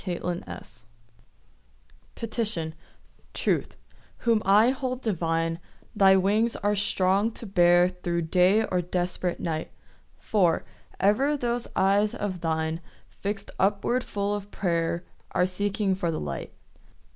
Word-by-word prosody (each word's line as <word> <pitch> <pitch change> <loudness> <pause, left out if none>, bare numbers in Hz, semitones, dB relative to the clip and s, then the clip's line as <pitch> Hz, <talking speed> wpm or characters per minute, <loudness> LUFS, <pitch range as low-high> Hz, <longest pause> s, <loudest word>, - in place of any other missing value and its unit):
PETITION 215 -8 -2 0.6
Truth, - - 0 0.4
whom 230 -2 +2
I 210 +5 +5
hold 255 -1 -3
divine, 165 -4 0 0.4
Thy 195 -2 +6
wings 210 +5 +2
are 205 +1 0
strong 195 +1 +2
to 230 - -7
bear 175 -2 +5
Thro' 175 -1 -2
day 185 +6 +3
or 180 -3 0
desperate 180 0 -2
night; 160 -2 -3 0.5
For, 180 -6 +1 0.3
ever 265 +9 +3
those 240 -2 -2
eyes 200 +2 +3
of 185 -4 -4
thine, 160 0 -1 0.3
Fix'd 200 0 -5
upward 210 +6 +1
full 200 0 -2
of 205 -1 -5
prayer, 170 -3 -1 0.3
Are 180 - +3
seeking 200 +1 0
for 180 -2 -1
the 165 - -2
light. 75 -2 -5
195 Hz, 115 wpm, -26 LUFS, 175-210 Hz, 0.6 s, Thy